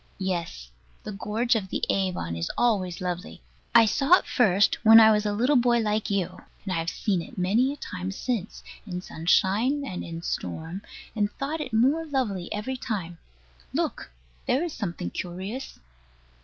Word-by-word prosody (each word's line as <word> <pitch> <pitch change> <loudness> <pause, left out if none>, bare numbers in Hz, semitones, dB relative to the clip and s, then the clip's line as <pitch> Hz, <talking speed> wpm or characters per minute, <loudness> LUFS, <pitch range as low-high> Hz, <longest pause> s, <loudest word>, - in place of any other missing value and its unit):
Yes. 170 - -4 0.3
The - - -6
gorge 215 +4 0
of 205 -5 -1
the - - -3
Avon 180 - -1
is 85 0 -3
always 190 -8 +1
lovely. 180 +1 -5 0.3
I 230 - +9
saw 275 +9 +2
it - - -6
first 205 -3 +3
when 225 0 +10
I 220 -1 +8
was 210 0 +2
a - - +1
little 245 +8 +2
boy 240 -1 +4
like 215 -1 0
you; 185 -2 -2 0.2
and 190 - -3
I - - 0
have 165 0 -1
seen 190 -3 -1
it 165 - -11
many 215 +9 +2
a - - -5
time 185 -8 -5
since, 215 -1 -4 0.2
in 180 -2 -4
sunshine 210 - +1
and 185 -9 -5
in 165 0 -7
storm, 160 - -4 0.3
and 205 -1 0
thought 305 +3 -3
it 270 -4 -5
more 265 +9 +3
lovely 220 - -2
every 240 +6 -3
time. 180 -9 -4 0.6
Look! - - -2 0.4
there 270 +6 +2
is 340 -3 -3
something 170 - -4
curious. 190 +9 -6
205 Hz, 170 wpm, -26 LUFS, 180-240 Hz, 0.6 s, when